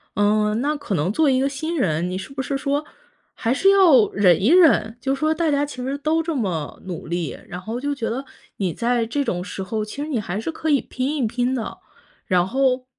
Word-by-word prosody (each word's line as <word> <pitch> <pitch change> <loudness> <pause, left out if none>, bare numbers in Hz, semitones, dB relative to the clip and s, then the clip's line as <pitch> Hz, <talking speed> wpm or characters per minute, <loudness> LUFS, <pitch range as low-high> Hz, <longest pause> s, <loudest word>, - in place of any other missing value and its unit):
嗯， 210 +2 +2
那 295 +2 0
可 285 -10 -3
能 165 +5 0
做 310 0 +3
一 260 -1 +3
个 270 - +2
新 315 +5 -3
人， 175 - 0
你 185 - -3
是 190 +8 -8
不 265 - -3
是 275 +1 -2
说， 285 +2 -1 0.5
还 230 +2 0
是 385 +8 +4
要 335 - +6
忍 185 -3 +4
一 205 - +2
忍？ 315 -10 +5
就 270 +2 -1
说 310 +3 0
大 320 -1 0
家 285 0 +2
其 290 - -9
实 270 +2 -2
都 320 +2 +1
这 325 -2 -2
么 175 - -3
努 180 -3 -6
力， 170 -4 -3
然 180 +1 -7
后 225 +5 -4
就 285 +1 -2
觉 230 -5 -3
得 260 +4 -3 0.3
你 185 -4 -1
在 240 -1 0
这 280 +5 -1
种 180 -7 -2
时 195 - -6
候， 215 +2 -3
其 280 +7 -7
实 300 - -3
你 255 - 0
还 205 0 -4
是 325 - -3
可 315 0 -3
以 280 - +4
拼 265 +4 -3
一 245 -5 +1
拼 245 +3 -1
的。 230 - -4 0.5
然 180 -1 +2
后 255 +2 +1
250 Hz, 255 characters per minute, -22 LUFS, 205-285 Hz, 0.5 s, 要